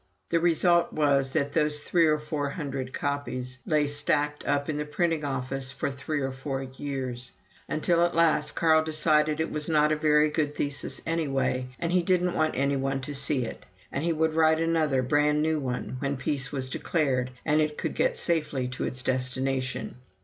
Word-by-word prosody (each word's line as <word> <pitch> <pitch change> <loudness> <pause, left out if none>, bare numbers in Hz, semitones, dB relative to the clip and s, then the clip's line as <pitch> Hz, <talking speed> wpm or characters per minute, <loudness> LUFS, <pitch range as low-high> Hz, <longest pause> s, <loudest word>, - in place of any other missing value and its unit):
The 170 - +2
result 170 +1 +3
was 140 -3 +2
that 140 -2 0
those 150 -2 +1
three 165 +1 +3
Or 155 0 +3
four 150 -1 -3
hundred 135 -5 -4
copies 130 -3 -3
lay 150 -2 +3
stacked 145 +1 0
up 140 0 +1
in 155 - -2
the 150 - -1
printing 160 +1 0
office 135 -1 -3
for 140 - -2
three 145 +2 -3
or 135 0 -1
four 135 0 -4
years, 130 -2 -5 0.4
until 170 +2 +2
at 175 -1 +1
last 160 -3 +3
Carl 160 -1 +4
decided 155 -1 +2
it 160 - -1
was 150 0 -2
not 150 -1 +3
a - - +3
very 150 0 +3
good 150 -1 -1
thesis 145 0 -3
anyway, 135 -5 0
and 170 - -2
he 180 0 +3
didn't 180 0 +1
want 155 -2 +1
any 140 +1 +1
one 135 0 -1
to 145 +2 -5
see 140 -2 -1
it, - - -8 0.3
and 140 - -2
he 170 - +1
would 160 0 +1
write 160 0 +4
another 160 -5 +1
brand 150 +3 +2
new 160 0 +1
one 130 -1 -4
when 140 0 -1
peace 135 0 -1
was 135 -3 -2
declared 130 -3 0 0.2
and 155 0 +3
it 150 -1 -1
could - - -2
get - - +1
safely 150 - 0
to 125 - -4
its 130 0 -4
destination. 130 0 -2
150 Hz, 190 wpm, -27 LUFS, 135-155 Hz, 0.4 s, Carl